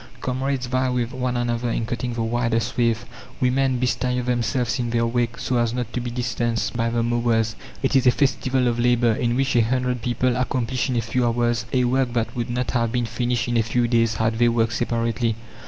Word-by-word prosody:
Comrades 130 Hz, +1 st, -2 dB
vie 130 Hz, +1 st, 0 dB
with 125 Hz, -1 st, -1 dB
one 125 Hz, -1 st, -1 dB
another 120 Hz, 0 st, -1 dB
in 115 Hz, -, -1 dB
cutting 120 Hz, +1 st, -3 dB
the 115 Hz, -, -1 dB
widest 115 Hz, -1 st, 0 dB
swathe, 115 Hz, -2 st, +2 dB, 0.4 s
women 130 Hz, 0 st, +2 dB
bestir 125 Hz, 0 st, 0 dB
themselves 120 Hz, +1 st, 0 dB
in 120 Hz, -1 st, -1 dB
their 115 Hz, 0 st, +1 dB
wake 115 Hz, 0 st, -1 dB
so 125 Hz, -, -1 dB
as 120 Hz, 0 st, 0 dB
not 125 Hz, -2 st, -4 dB
to 125 Hz, -, -1 dB
be 120 Hz, -, -4 dB
distanced 120 Hz, -1 st, -2 dB
by 115 Hz, 0 st, 0 dB
the 115 Hz, 0 st, 0 dB
mowers. 115 Hz, -2 st, +1 dB, 0.3 s
It 135 Hz, -, +1 dB
is 130 Hz, -1 st, +4 dB
a -, -, +8 dB
festival 130 Hz, -1 st, +1 dB
of 120 Hz, 0 st, 0 dB
labour, 120 Hz, -1 st, +3 dB
in 120 Hz, +2 st, 0 dB
which 135 Hz, 0 st, +1 dB
a 120 Hz, -, +6 dB
hundred 125 Hz, +1 st, 0 dB
people 125 Hz, +1 st, 0 dB
accomplish 125 Hz, 0 st, -1 dB
in 125 Hz, -, 0 dB
a 115 Hz, -, +2 dB
few 125 Hz, +3 st, -1 dB
hours 120 Hz, -1 st, 0 dB
a 130 Hz, -1 st, +2 dB
work 125 Hz, 0 st, +1 dB
that 115 Hz, -2 st, -1 dB
would 120 Hz, 0 st, -3 dB
not 125 Hz, +1 st, -1 dB
have 115 Hz, -2 st, 0 dB
been 120 Hz, -1 st, 0 dB
finished 120 Hz, +2 st, -1 dB
in 120 Hz, -1 st, +1 dB
a -, -, +4 dB
few 120 Hz, +2 st, 0 dB
days 115 Hz, -1 st, +2 dB
had 110 Hz, 0 st, 0 dB
they 120 Hz, 0 st, +5 dB
worked 115 Hz, -1 st, +1 dB
separately. 115 Hz, -1 st, 0 dB
120 Hz, 220 wpm, -23 LUFS, 115-125 Hz, 0.4 s, a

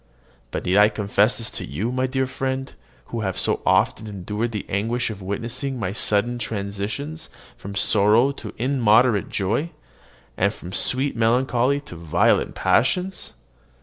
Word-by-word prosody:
But -, -, -4 dB
need 90 Hz, +2 st, +2 dB
I 105 Hz, +1 st, +7 dB
confess 105 Hz, +1 st, +1 dB
this 115 Hz, -, -3 dB
to -, -, -5 dB
you, 100 Hz, -, -3 dB
my 130 Hz, +1 st, 0 dB
dear 130 Hz, 0 st, 0 dB
friend, 130 Hz, +1 st, -3 dB, 0.4 s
who 115 Hz, -, -1 dB
have 95 Hz, -4 st, -2 dB
so -, -, +1 dB
often 110 Hz, -, +2 dB
endured 105 Hz, +3 st, -3 dB
the 105 Hz, -3 st, -4 dB
anguish 115 Hz, +4 st, -1 dB
of 100 Hz, -2 st, -8 dB
witnessing 120 Hz, +7 st, -3 dB
my 95 Hz, -6 st, -2 dB
sudden 110 Hz, +3 st, +1 dB
transitions 110 Hz, +9 st, -4 dB, 0.3 s
from 100 Hz, +1 st, -8 dB
sorrow 105 Hz, +6 st, +4 dB
to 140 Hz, -, -9 dB
immoderate 120 Hz, -3 st, +3 dB
joy, 110 Hz, -, -1 dB, 0.7 s
and 100 Hz, +2 st, +2 dB
from 90 Hz, -3 st, -10 dB
sweet 130 Hz, +5 st, 0 dB
melancholy 125 Hz, +3 st, +2 dB
to 115 Hz, -, -11 dB
violent 80 Hz, -2 st, +1 dB
passions? 180 Hz, +9 st, +1 dB
115 Hz, 150 wpm, -23 LUFS, 100-130 Hz, 0.7 s, I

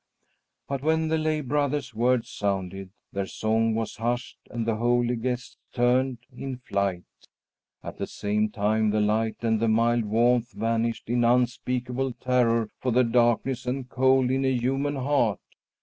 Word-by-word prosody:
But 140 Hz, -1 st, -3 dB
when 160 Hz, +1 st, +1 dB
the 160 Hz, -, +2 dB
lay 155 Hz, -1 st, 0 dB
brother's 145 Hz, -1 st, -1 dB
words 120 Hz, +2 st, +1 dB
sounded, 95 Hz, -1 st, -3 dB, 0.2 s
their 100 Hz, 0 st, -2 dB
song 110 Hz, +2 st, 0 dB
was 115 Hz, -1 st, -3 dB
hushed 120 Hz, +3 st, -2 dB
and 115 Hz, -2 st, -3 dB
the 115 Hz, -1 st, 0 dB
holy 120 Hz, +1 st, +2 dB
guests 125 Hz, +1 st, -4 dB
turned 125 Hz, +1 st, +2 dB, 0.2 s
in 130 Hz, 0 st, -5 dB
flight. 100 Hz, -7 st, -2 dB, 0.8 s
At -, -, -7 dB
the -, -, -2 dB
same 105 Hz, +1 st, -1 dB
time 110 Hz, +1 st, +1 dB
the 105 Hz, +1 st, +1 dB
light 110 Hz, +2 st, 0 dB
and 110 Hz, -1 st, +2 dB
the 115 Hz, -, +1 dB
mild 115 Hz, +1 st, +2 dB
warmth 120 Hz, +2 st, +2 dB
vanished 115 Hz, 0 st, -1 dB
in 120 Hz, +1 st, +1 dB
unspeakable 125 Hz, +1 st, 0 dB
terror 120 Hz, -3 st, +1 dB
for 130 Hz, -, -1 dB
the 125 Hz, +2 st, +4 dB
darkness 120 Hz, +1 st, +1 dB
and 130 Hz, 0 st, -2 dB
cold 130 Hz, -1 st, +3 dB
in 135 Hz, +1 st, +1 dB
a 130 Hz, -, +2 dB
human 135 Hz, +4 st, 0 dB
heart. 130 Hz, -7 st, +1 dB
120 Hz, 155 wpm, -26 LUFS, 110-130 Hz, 0.8 s, the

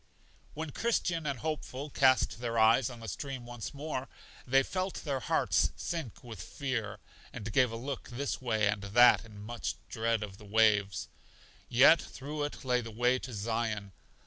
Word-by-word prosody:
When 155 Hz, 0 st, -4 dB
Christian 170 Hz, -, 0 dB
and 140 Hz, -2 st, -1 dB
Hopeful 150 Hz, -1 st, -4 dB
cast 130 Hz, -3 st, +3 dB
their 115 Hz, -1 st, -2 dB
eyes 115 Hz, +3 st, +5 dB
on 120 Hz, -2 st, -10 dB
the 115 Hz, -, -7 dB
stream 135 Hz, 0 st, -5 dB
once 120 Hz, -3 st, -6 dB
more, 140 Hz, -2 st, -4 dB, 0.4 s
they 135 Hz, +2 st, +5 dB
felt 185 Hz, +5 st, -3 dB
their 140 Hz, -4 st, -1 dB
hearts -, -, +2 dB
sink 160 Hz, -, -5 dB
with 115 Hz, -7 st, -8 dB
fear, 125 Hz, -2 st, -3 dB, 0.3 s
and 110 Hz, 0 st, -6 dB
gave 125 Hz, -3 st, +4 dB
a -, -, -5 dB
look 130 Hz, +3 st, -5 dB
this 130 Hz, +3 st, -3 dB
way 110 Hz, -4 st, +1 dB
and 100 Hz, 0 st, 0 dB
that 115 Hz, +6 st, +6 dB
in 105 Hz, -2 st, -13 dB
much 120 Hz, +2 st, -4 dB
dread 115 Hz, -1 st, 0 dB
of 100 Hz, -2 st, -8 dB
the -, -, -13 dB
waves. 105 Hz, -2 st, +3 dB, 0.6 s
Yet 130 Hz, +7 st, +7 dB
through 145 Hz, +2 st, -5 dB
it 145 Hz, -, -7 dB
lay 125 Hz, -1 st, +2 dB
the 115 Hz, -, -7 dB
way 120 Hz, +3 st, +2 dB
to 130 Hz, -, -7 dB
Zion. 110 Hz, -2 st, -2 dB
120 Hz, 170 wpm, -31 LUFS, 110-140 Hz, 0.6 s, Yet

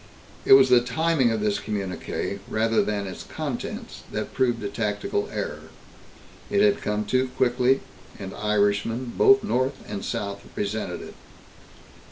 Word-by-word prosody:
It -, -, +7 dB
was 135 Hz, -1 st, +8 dB
the 125 Hz, -1 st, +6 dB
timing 135 Hz, +2 st, +2 dB
of 110 Hz, -2 st, -1 dB
this 105 Hz, -1 st, +1 dB
communiqué, 100 Hz, -1 st, -4 dB
rather 110 Hz, +1 st, +2 dB
than 105 Hz, -1 st, -2 dB
its 95 Hz, -, -7 dB
contents, -, -, -5 dB
that -, -, -4 dB
proved 120 Hz, -3 st, +1 dB
a -, -, -1 dB
tactical 105 Hz, -, -2 dB
error. -, -, -5 dB, 0.8 s
It 205 Hz, -1 st, +2 dB
had 205 Hz, -1 st, +3 dB
come 105 Hz, 0 st, -1 dB
too 130 Hz, +4 st, +1 dB
quickly, 125 Hz, +1 st, +3 dB, 0.4 s
and 95 Hz, -2 st, -7 dB
Irishmen, 105 Hz, +3 st, 0 dB
both 405 Hz, 0 st, +6 dB
north 130 Hz, +2 st, 0 dB
and 100 Hz, -1 st, -5 dB
south, 100 Hz, 0 st, -3 dB
resented 100 Hz, -3 st, -3 dB
it. -, -, -10 dB
115 Hz, 145 wpm, -25 LUFS, 105-130 Hz, 0.8 s, was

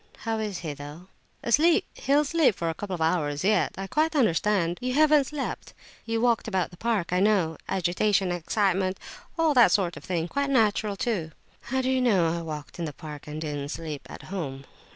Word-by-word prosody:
How 225 Hz, 0 st, -2 dB
is 210 Hz, -4 st, -3 dB
he, 150 Hz, -, -3 dB
though?" 145 Hz, +6 st, -10 dB, 0.3 s
"Asleep—he'll 295 Hz, +1 st, +2 dB
sleep 300 Hz, -, +3 dB
for 165 Hz, -2 st, -1 dB
a -, -, -5 dB
couple 195 Hz, +2 st, -5 dB
of 170 Hz, -, -7 dB
hours 150 Hz, -3 st, 0 dB
yet. 210 Hz, +2 st, +2 dB
I 195 Hz, -, -4 dB
quite 310 Hz, -, 0 dB
understand—you 210 Hz, -, +1 dB
haven't 300 Hz, -1 st, +5 dB
slept—you 260 Hz, -5 st, -5 dB
walked 235 Hz, -1 st, +2 dB
about 190 Hz, -5 st, -1 dB
the 175 Hz, -, -14 dB
park, 215 Hz, -6 st, -1 dB
I 180 Hz, -, +3 dB
know. 190 Hz, -5 st, +2 dB
Agitation—excitement—all 190 Hz, -, 0 dB
that 240 Hz, -8 st, +6 dB
sort 180 Hz, -4 st, +1 dB
of -, -, -10 dB
thing—quite 185 Hz, +11 st, -1 dB
natural, 215 Hz, -5 st, +2 dB
too!" 190 Hz, -8 st, -2 dB, 0.3 s
"How 260 Hz, +2 st, -1 dB
do 260 Hz, -, +1 dB
you 260 Hz, -1 st, +2 dB
know 185 Hz, -9 st, +3 dB
I 170 Hz, -, -3 dB
walked 155 Hz, 0 st, -7 dB
in 170 Hz, -, -1 dB
the 150 Hz, -, -5 dB
park 150 Hz, -1 st, -9 dB
and 150 Hz, +1 st, -5 dB
didn't 145 Hz, -2 st, -4 dB
sleep 155 Hz, -2 st, -6 dB
at -, -, -10 dB
home?" 140 Hz, -8 st, -5 dB
195 Hz, 175 wpm, -26 LUFS, 165-235 Hz, 0.3 s, that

